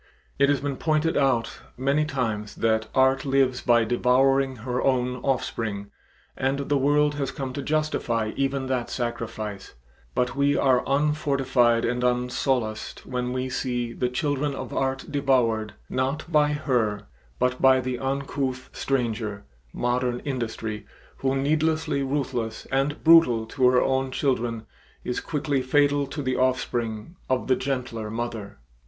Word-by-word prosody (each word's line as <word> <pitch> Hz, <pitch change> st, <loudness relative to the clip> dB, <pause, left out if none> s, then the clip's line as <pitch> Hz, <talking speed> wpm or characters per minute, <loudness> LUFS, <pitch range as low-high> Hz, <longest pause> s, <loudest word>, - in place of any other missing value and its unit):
It 140 Hz, 0 st, +5 dB
has 145 Hz, -1 st, +2 dB
been 140 Hz, -2 st, -3 dB
pointed 155 Hz, 0 st, +1 dB
out 135 Hz, -5 st, +1 dB, 0.2 s
many 140 Hz, +4 st, +1 dB
times 115 Hz, -8 st, -3 dB
that 110 Hz, -1 st, +1 dB
Art 130 Hz, +1 st, +4 dB
lives 135 Hz, -2 st, +2 dB
by 120 Hz, -1 st, +4 dB
devouring 130 Hz, +3 st, +2 dB
her 125 Hz, 0 st, -1 dB
own 125 Hz, -1 st, +1 dB
offspring 115 Hz, -6 st, -2 dB, 0.4 s
and 135 Hz, +1 st, 0 dB
the 145 Hz, -, +3 dB
world 145 Hz, +2 st, +3 dB
has 135 Hz, -, -1 dB
come 135 Hz, -2 st, -5 dB
to 140 Hz, -, -4 dB
justify 135 Hz, -7 st, 0 dB
even 135 Hz, -1 st, -1 dB
that 130 Hz, -2 st, -1 dB
sacrifice, 110 Hz, -4 st, -4 dB, 0.4 s
but 125 Hz, 0 st, 0 dB
we 140 Hz, +1 st, +2 dB
are 130 Hz, -2 st, +3 dB
unfortified 135 Hz, -5 st, +2 dB
and 125 Hz, +1 st, -1 dB
unsolaced 125 Hz, -2 st, -1 dB
when 125 Hz, -1 st, -2 dB
we 130 Hz, 0 st, -2 dB
see 120 Hz, -2 st, -2 dB
the 125 Hz, +1 st, -1 dB
children 145 Hz, +1 st, -1 dB
of -, -, -6 dB
Art 135 Hz, 0 st, -1 dB
devoured, 125 Hz, -7 st, +1 dB
not 135 Hz, +4 st, -1 dB
by 150 Hz, -1 st, +4 dB
her, 120 Hz, -9 st, 0 dB, 0.3 s
but 125 Hz, 0 st, 0 dB
by 130 Hz, 0 st, +6 dB
the 125 Hz, -1 st, -3 dB
uncouth 135 Hz, -1 st, -3 dB
stranger, 115 Hz, -6 st, -2 dB, 0.3 s
Modern 125 Hz, 0 st, -1 dB
Industry, 115 Hz, -5 st, -4 dB, 0.3 s
who, 135 Hz, 0 st, 0 dB
needlessly 155 Hz, +1 st, +1 dB
ruthless 130 Hz, -5 st, -2 dB
and 135 Hz, +2 st, 0 dB
brutal 160 Hz, -9 st, +6 dB
to 125 Hz, +2 st, +2 dB
her 125 Hz, 0 st, +4 dB
own 135 Hz, 0 st, 0 dB
children, 120 Hz, -4 st, -1 dB, 0.4 s
is 125 Hz, -, -2 dB
quickly 145 Hz, -3 st, -1 dB
fatal 145 Hz, +2 st, +2 dB
to 145 Hz, +2 st, -5 dB
the 130 Hz, -1 st, -1 dB
offspring 125 Hz, +1 st, -1 dB
of 130 Hz, -1 st, +1 dB
the 130 Hz, -, +3 dB
gentler 125 Hz, -5 st, -3 dB
mother. 110 Hz, -4 st, -5 dB
130 Hz, 140 wpm, -25 LUFS, 120-140 Hz, 0.4 s, by